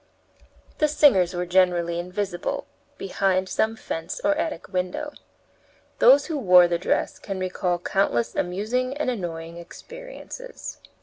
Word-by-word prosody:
The 305 - +4
singers 195 - +4
were 175 0 -1
generally 175 -1 +2
invisible 180 +1 -3 0.3
behind 190 -1 0
some 220 +3 0
fence 165 -5 -5
or 300 0 +4
attic 320 0 -3
window. 185 +12 -2 0.9
Those 275 +4 +7
who 315 -4 -3
wore 180 -6 +7
the 170 -1 -1
dress 180 - -1
can 195 -2 -5
recall 180 -1 -1
countless 175 -10 0
amusing 235 +9 -1
and 295 -4 0
annoying 170 -6 -5
experiences. - - -9
190 Hz, 125 wpm, -24 LUFS, 175-270 Hz, 0.9 s, Those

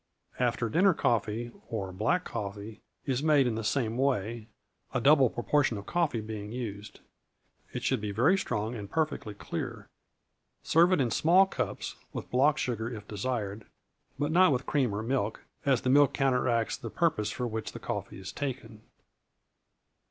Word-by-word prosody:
After 120 -2 +1
dinner 180 - +4
coffee, 115 -1 0 0.2
or 100 -5 -3
black 115 - +1
coffee, 100 +1 -6 0.2
is 130 -1 0
made 150 -3 +4
in 120 - +1
the 110 0 -3
same 115 0 0
way, 115 -4 0 0.5
a - - +3
double 135 0 +5
proportion 120 -1 +1
of 100 - -8
coffee 160 -8 0
being 105 -1 -6
used. 110 -4 -6 0.7
It - - -5
should 130 -5 +1
be 105 -1 -3
very 125 - +4
strong, 110 - -2
and 105 -4 -6
perfectly 155 -9 -2
clear. - - -5 0.7
Serve 170 +3 +4
it 160 - +3
in 120 -3 0
small 180 +4 +5
cups, 195 - -4 0.2
with - - -6
block 140 +4 +4
sugar 115 -5 -2
if 105 -3 -8
desired, 105 -1 -3 0.5
but 145 +2 -1
not 180 0 +6
with 130 -1 0
cream 135 -6 +1
or 105 - -3
milk, 115 -3 -1 0.2
as 130 -4 +3
the 130 - 0
milk 145 +1 +5
counteracts 125 -4 +1
the 115 - -6
purpose 110 -8 +1
for 125 +4 -3
which 110 -2 -4
the - - -8
coffee - - -4
is 95 - -7
taken. 125 -6 -5
120 Hz, 165 wpm, -29 LUFS, 110-140 Hz, 0.7 s, not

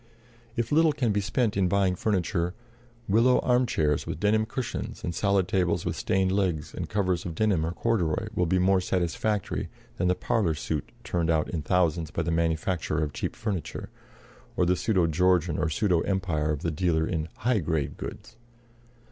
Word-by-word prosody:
If 115 -1 -2
little 160 0 +4
can 125 -6 0
be 105 0 +1
spent 105 +2 0
in 95 -2 +2
buying 95 0 +2
furniture, 90 -2 0 0.5
willow 115 +5 +4
arm 125 0 +2
chairs 75 -7 0
with - - -4
denim 110 +2 +2
cushions 125 +1 -4
and 85 - -2
solid 100 -1 +1
tables 90 -3 +1
with - - -1
stained 95 0 +1
legs 95 -6 -1
and - - -5
covers 95 -4 0
of 85 -2 -5
denim 100 -4 +2
or 80 - -1
corduroy 90 -5 0
will 90 - +1
be 95 - +2
more 95 +1 +3
satisfactory 95 +3 -1 0.3
than 90 - +1
the 90 - +3
"parlor 105 -9 0
suit" 75 -1 -3
turned 85 -2 -1
out 80 -2 +1
in 85 - -2
thousands 85 -1 +1
by 85 - -2
the 85 - -1
manufacturer 80 -1 0
of 75 -1 -3
cheap - - -3
furniture, 100 -7 -4 0.7
or 90 - +3
the 90 +1 +3
pseudo 95 -3 +2
Georgian 85 0 +2
or 80 - +1
pseudo 90 -1 +2
Empire 85 -6 -1
of 75 -2 -2
the 85 - 0
dealer 80 0 +1
in 80 -1 -2
"high 120 -1 +1
grade 80 -4 -1
goods." - - -8
90 Hz, 180 wpm, -27 LUFS, 80-105 Hz, 0.7 s, little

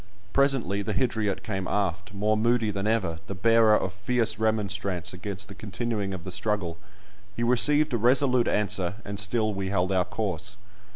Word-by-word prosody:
Presently 135 -8 +2
the 105 +1 -3
Hydriot 110 -4 0
came 95 -1 -3
aft, 100 +1 -2
more 105 +2 +1
moody 115 0 +2
than 100 +1 -2
ever, 95 -8 0
the 100 - -5
bearer 115 +2 +5
of 95 - -3
fierce 110 +3 0
remonstrance 100 -5 -1
against 100 +2 -5
the 100 - -10
continuing 105 0 -3
of 95 -3 -6
the 95 - -7
struggle; 90 -3 -2 0.6
he 120 - -2
received 145 +5 +4
a - - +2
resolute 125 +1 +3
answer, 95 -3 0
and 100 0 -3
still 110 +1 0
we 95 -1 -3
held 95 -1 0
our 90 -2 +2
course. 95 -2 -3
105 Hz, 170 wpm, -26 LUFS, 95-115 Hz, 0.6 s, bearer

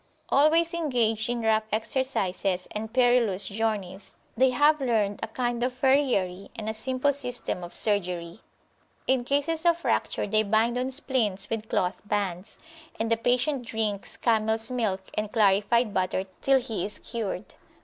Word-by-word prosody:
Always 325 +4 +4
engaged 240 -9 0
in 240 -1 -2
rough 220 -1 +2
exercises 205 -6 -1
and 220 +1 -5
perilous 245 -6 +3
journeys, 205 -3 -3 0.2
they 260 +3 +4
have 290 +4 +3
learned 215 -6 +1
a - - -2
kind 240 +1 -2
of 250 +1 0
farriery 250 -9 +1
and 215 -1 -6
a 220 - -1
simple 260 +5 0
system 245 -9 -3
of 175 - -7
surgery. 180 -3 -1 0.6
In 260 -1 +2
cases 290 +5 0
of 340 -1 +4
fracture 340 - -1
they 215 +1 +2
bind 220 +3 +2
on 250 +1 -1
splints 245 -8 -2
with 220 -1 -3
cloth 180 +1 0
bands, 195 -1 -2 0.4
and 225 +1 -1
the - - +5
patient 250 +4 +1
drinks 220 -3 -2
camels 225 0 +1
milk 215 -6 -1
and 210 0 -2
clarified 210 +2 +3
butter 185 0 0 0.2
till 270 -1 +4
he 225 -7 -4
is 210 - -4
cured. 215 -4 -5
225 Hz, 150 wpm, -27 LUFS, 205-255 Hz, 0.6 s, the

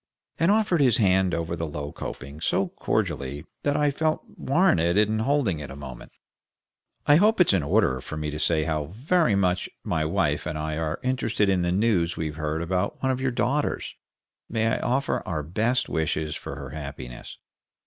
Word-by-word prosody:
and 165 - +3
offered 205 -6 +3
his 125 -5 +4
hand 95 -3 +3
over 85 0 -2
the 80 -1 -3
low 75 -1 -5
coping 70 +3 -7
so - - +1
cordially 70 +3 -2 0.2
that 145 0 +1
I 150 -1 +3
felt 155 +2 0
warranted 130 - +2
in 105 +1 +3
holding 110 - +1
it 70 - -7
a 70 - -8
moment. 65 -4 -9 0.9
"I 145 - +6
hope 215 +4 +4
it's 175 - +5
in 95 - +3
order 65 -3 +2
for 75 - -7
me 75 -1 -3
to 75 - -5
say 80 -1 +2
how 75 -2 -1
very 125 - +1
much 90 -2 +1
my 80 - 0
wife 80 -3 0
and 75 - -3
I 75 0 -2
are 80 0 -2
interested 115 -5 +1
in 95 -2 +2
the 85 0 +1
news 95 -4 +1
we've 80 -1 -3
heard 80 +1 -2
about 90 +3 -1
one 130 - +3
of 130 0 -2
your 135 - +1
daughters? 130 +4 -1 0.6
May 110 -1 0
I - - 0
offer 135 +3 0
our 80 -5 -2
best 110 - 0
wishes 80 -1 -1
for - - -6
her 70 -1 -8
happiness?" 70 -5 -8
90 Hz, 190 wpm, -26 LUFS, 75-125 Hz, 0.9 s, I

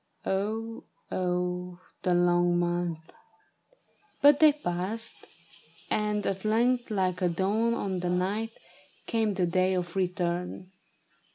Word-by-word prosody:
Oh, 220 +4 -2 0.3
oh, 180 0 -2 0.2
the 180 -1 +2
long 175 0 +3
months! 175 -2 -2 1.1
But 285 0 +6
they 310 -1 +8
passed, 210 -4 -3 0.8
and 210 -1 0
at 195 -1 -2
length, 240 +3 +2
like 185 -3 0
a 180 - +3
dawn 210 +7 +1
on 190 -5 -2
the 175 0 -2
night. 200 +5 -1 0.5
Came 220 -4 0
the 185 - +2
day 185 +2 +2
of 175 -1 -3
return. 180 0 -2
185 Hz, 115 wpm, -28 LUFS, 175-215 Hz, 1.1 s, they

